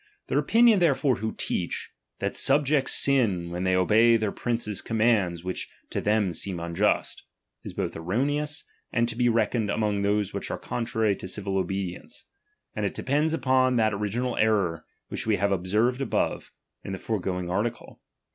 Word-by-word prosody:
Their - - +2
opinion 230 -3 +5
therefore 140 -6 +2
who 110 +3 -4
teach, 85 - -3 0.3
that - - -3
subjects 140 0 +3
sin 100 -11 +3
when 90 +2 -3
they 95 0 +2
obey 110 +5 +5
their 110 -2 -1
prince's 115 -4 -2
commands 110 -7 +1
which 90 0 -4 0.2
to - - -2
them 105 -3 +1
seem 90 +2 -2
unjust, 85 +5 0 0.4
is - - -8
both - - -3
erroneous, 145 - -1 0.3
and 115 0 +1
to 115 - -3
be 120 0 +2
reckoned 115 -1 +1
among 105 -1 0
those 105 0 0
which - - -4
are - - -3
contrary 110 -3 -1
to - - -7
civil 95 +1 -3
obedience; 95 -1 -4 0.5
and - - -2
it - - -2
depends 150 +4 +1
upon 130 -4 +2
that 110 -2 +2
original 110 +5 -2
error 100 -7 +1 0.2
which - - -4
we 110 - +3
have 100 +1 0
observed 105 +8 +1
above, 135 - -1 0.3
in 95 - -5
the - - -3
foregoing 90 -4 -3
article. 110 +5 -3
110 Hz, 165 wpm, -26 LUFS, 95-125 Hz, 0.5 s, opinion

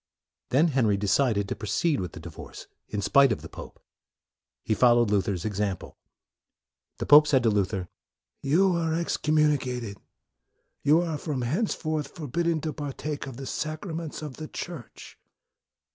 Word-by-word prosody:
Then 150 +6 +4
Henry 115 -8 +2
decided 100 +1 +1
to - - -3
proceed 110 +9 0
with 90 -4 -4
the - - -8
divorce 80 -1 -10 0.2
in 105 -1 -3
spite 140 +2 +5
of 110 - -2
the - - -7
pope. - - -10 0.8
He - - 0
followed 120 -1 +4
Luther's 100 -3 0
example. 100 -3 -3 1.0
The - - -3
pope 150 +1 +8
said 135 -4 +3
to 115 - +4
Luther, 95 -2 0 0.3
" - - -57
You 185 +3 +4
are 165 -1 0
excommuni 155 -3 +2
cated; 125 -6 -5 0.8
you 150 +4 +4
are 165 -4 -2
from 145 -6 -3
henceforth 155 - -1
forbidden 165 +1 -1
to 155 0 -3
partake 145 0 -5
of 130 -3 -8
the 135 - -6
sacraments 155 +1 -4
of 145 -4 -7
the 155 - -6
Church." 165 -9 -8
140 Hz, 150 wpm, -27 LUFS, 105-155 Hz, 1.0 s, pope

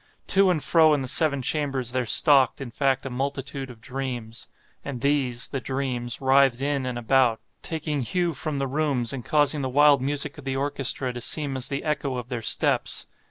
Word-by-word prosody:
To 195 -1 +5
and 160 -5 0
fro 160 -2 +4
in 145 - -2
the - - -5
seven 140 -1 +2
chambers 135 -4 -1
there 125 -1 -2
stalked, 140 +2 +5
in 135 -3 -7
fact, 135 +1 0
a 135 - -5
multitude 135 +1 -4
of 115 -3 -13
dreams. 125 -4 -5 0.4
And 140 -3 -6
these—the 135 -2 -1
dreams—writhed 130 0 +1
in 140 -1 -2
and 125 -1 -4
about, 120 -1 +2 0.2
taking 155 -3 -1
hue 175 +7 -1
from 150 +1 -3
the 135 - -1
rooms, 135 -4 -1
and 130 -3 -6
causing 150 +1 +2
the 130 - -2
wild 145 +1 +4
music 140 +2 -2
of - - -11
the 135 -1 -2
orchestra 135 -2 0
to 120 - -7
seem 145 +1 +1
as 130 -1 -1
the 140 0 -4
echo 145 -4 -2
of 125 0 -7
their 125 -3 -4
steps. - - 0
135 Hz, 190 wpm, -24 LUFS, 125-145 Hz, 0.4 s, To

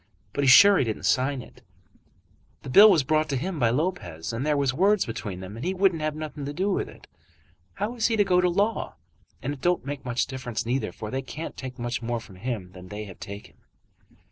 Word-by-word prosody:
But 145 - -1
he's 135 - +4
sure 200 +9 +8
he - - +3
didn't 110 -4 -4
sign 130 +7 +1
it. 125 - -17 1.0
The 135 - -6
bill 205 +10 +9
was 170 -8 +4
brought 155 +3 +1
to 140 - 0
him 170 +5 -3
by 120 -3 +3
Lopez, 115 - -2
and 115 +3 -2
there 150 0 +1
was 140 -2 +1
words 195 +7 +3
between 105 -5 -5
them, 95 +3 -8
and 115 - -7
he 185 +3 -1
wouldn't 185 -4 +2
have 155 -1 -1
nothing 155 -1 -6
to 145 - -4
do 190 +6 0
with - - -1
it. - - -15 0.7
How 210 +4 -2
is 230 -2 +1
he 225 - +1
to 210 - +4
go 180 -2 +3
to 180 - +3
law? 205 +5 0 0.5
And 140 +3 -2
it 135 - -11
don't 175 -3 +1
make 145 0 -5
much 125 -1 0
difference 130 -4 -5
neither, 125 +3 -1
for 105 -1 -7
they 135 - -2
can't 150 +4 -7
take 130 -1 -7
much 120 0 -3
more 120 0 -2
from 100 -4 -14
him 100 -4 -4
than 90 -1 -12
they 105 +2 -6
have 95 -3 -12
taken." 100 +1 -9
135 Hz, 235 wpm, -26 LUFS, 115-175 Hz, 1.0 s, bill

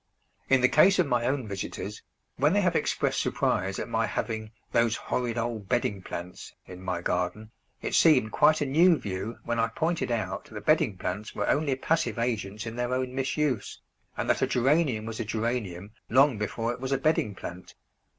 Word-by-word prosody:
In 135 -1 +5
the 125 - +6
case 185 +9 +5
of 180 - +4
my 125 -3 +1
own 130 -3 -1
visitors, 100 +1 -5 0.3
when 145 +6 +3
they 205 - +3
have 180 -3 +1
expressed - - +1
surprise - - 0
at - - -4
my - - 0
having 110 -1 -3 0.2
"those 115 -1 +3
horrid 120 -2 -2
old 115 -4 -3
bedding 100 -2 0
plants" 90 0 -8
in 90 0 -10
my 90 -2 -3
garden, 90 +6 -2 0.3
it - - -3
seemed 130 -10 +5
quite 155 +7 +4
a - - +2
new 165 +5 +5
view 100 +1 -5
when 120 0 -1
I 115 - +3
pointed 160 +8 -1
out 115 -2 -2
that - - -9
bedding 95 - +3
plants 100 +4 -4
were 105 - -1
only 145 -2 +2
passive 160 +1 0
agents 110 -3 -2
in 115 +1 -6
their 120 +1 0
own 130 0 -2
misuse, 135 -3 -1 0.4
and - - -2
that - - +2
a - - +3
Geranium 130 -3 +2
was 115 0 -6
a - - 0
Geranium 110 -4 -3 0.2
long 130 -2 +4
before 115 +3 -2
it 120 - -9
was 130 +1 -4
a 135 - +3
bedding 130 -7 +1
plant! 90 0 -9
120 Hz, 190 wpm, -27 LUFS, 105-135 Hz, 0.4 s, the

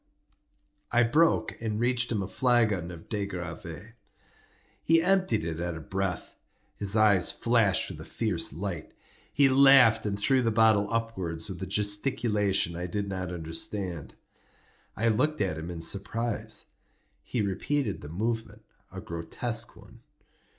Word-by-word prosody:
I 120 0 +4
broke 120 -2 +2
and 110 -2 -2
reached 120 0 0
him 105 -4 -1
a - - -5
flagon 105 -6 +1
of 85 -2 -11
De 105 -3 -3
Gr√¢ve. 90 +2 -8 0.9
He 165 +1 +4
emptied 185 - +2
it 80 -1 -4
at 85 -1 -3
a - - -7
breath. 95 +2 -4 0.4
His 100 0 +3
eyes 105 -4 +4
flashed 115 -6 +1
with - - -9
a - - -10
fierce 100 -8 -1
light. 85 +1 -6 0.4
He 140 -1 +5
laughed 130 -5 +6
and 100 -1 -2
threw 130 +6 +2
the 115 - +1
bottle 110 -2 +3
upwards 95 -8 -3
with 90 -1 -8
a 95 - -4
gesticulation 105 -4 0
I 90 +1 -4
did 100 +3 -3
not 95 -2 -4
understand. 85 -1 -4 0.8
I 115 - +1
looked 145 +8 +1
at 90 -6 -1
him 80 +2 -6
in 85 -2 -6
surprise. 105 +6 -1 0.4
He 120 -4 -2
repeated 105 +4 -1
the 75 - -9
movement—a 110 +3 -5
grotesque 95 +8 -2
one. - - -16
105 Hz, 145 wpm, -28 LUFS, 90-115 Hz, 0.9 s, laughed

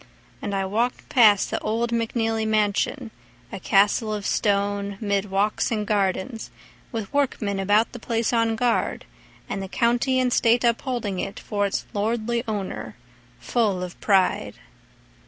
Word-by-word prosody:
And 205 -2 -3
I 195 0 0
walked 230 +6 -1
past 215 -6 +5
the - - -1
old 230 +2 -1
McNeely 225 -1 0
mansion, 215 +3 0 0.4
A 195 - -6
castle 205 +4 +2
of 205 -1 -6
stone 200 -1 0
'mid 200 -2 -1
walks 200 +2 +1
and 215 -2 -1
gardens 205 +3 -1 0.4
With 225 -5 -5
workmen 220 -8 0
about 205 +4 +2
the 240 - -8
place 230 +1 -1
on 230 -1 +2
guard 240 +1 0 0.4
And 195 - -4
the 195 - -5
County 240 +5 +1
and 250 -1 +1
State 235 +1 +3
upholding 235 -4 0
it 195 - -4
For 205 -2 -1
its 195 - -3
lordly 230 +3 -1
owner, 195 - -4 0.4
full 205 -7 0
of 180 -1 -8
pride. 195 -3 +2
215 Hz, 145 wpm, -24 LUFS, 200-235 Hz, 0.4 s, past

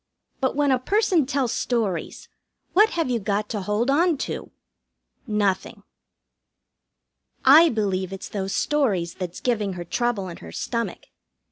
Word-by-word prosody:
But 260 -1 0
when 285 -1 +2
a 255 - +3
person 370 - +2
tells 270 -4 0
stories, 210 -9 -2 0.5
what 425 +3 +6
have 330 -7 -1
you 235 - +1
got 205 0 -1
to 210 - -3
hold 210 +7 0
on 330 +2 +3
to? - - -5 0.8
Nothing. 205 -3 -1 1.6
I 310 +5 +8
believe 195 - -1
it's 195 - -6
those 195 -2 -3
stories 205 - +1
that's 180 -2 -6
giving 215 -6 0
her 175 -1 -6
trouble 240 -4 -1
in 175 - -8
her 80 - -11
stomach. 230 - -3
225 Hz, 140 wpm, -24 LUFS, 195-275 Hz, 1.6 s, I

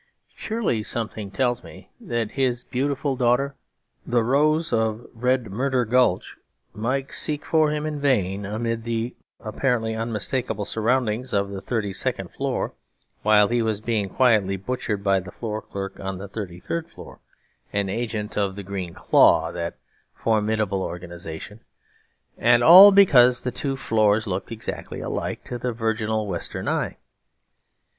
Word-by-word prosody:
Surely 220 - -1
something 110 -2 -4
tells 120 +4 0
me - - -13
that 115 -3 -3
his 125 -2 0
beautiful 140 +2 -1
daughter, 125 +3 +1 0.5
the 120 -1 +1
Rose 155 +6 +2
of 110 0 0
Red 125 -1 0
Murder 125 +3 0
Gulch, 120 -5 +1 0.4
might 130 +5 -2
seek 150 -1 -2
for 155 -2 +3
him 150 0 -2
in 150 -1 -3
vain 105 -9 +1
amid 115 +3 -3
the 115 +1 -3 0.3
apparently 115 0 -1
unmistakable 110 0 -2
surroundings 120 +2 0
of 100 0 0
the 95 -1 -6
thirty 105 -4 -2
second - - -1
floor, - - -2 0.5
while 105 -1 +5
he 120 0 +1
was 110 -2 0
being 110 -3 -1
quietly 105 -5 +3
butchered 105 -1 -3
by 100 -1 +3
the 90 -1 -9
floor 110 0 -5
clerk 95 0 -7
on 95 -1 -4
the 100 +2 -7
thirty 95 -4 -7
third 165 - -4
floor, - - -12 0.5
an 100 -1 0
agent 110 0 -3
of 100 -2 0
the 100 - -6
Green 95 -3 -5
Claw - - +4
(that 85 0 -5 0.4
formidable 110 -3 0
organisation); 85 +2 -7 0.8
and 120 +1 +4
all 185 +8 +11
because 130 -11 +6
the 125 - -1
two 135 +2 -2
floors 110 -3 +2
looked 95 0 -4
exactly 115 0 -6
alike - - -4
to 120 - -6
the 125 +1 -2
virginal 110 -1 -1
Western 90 -4 -4
eye. - - -1
115 Hz, 145 wpm, -24 LUFS, 100-125 Hz, 0.8 s, all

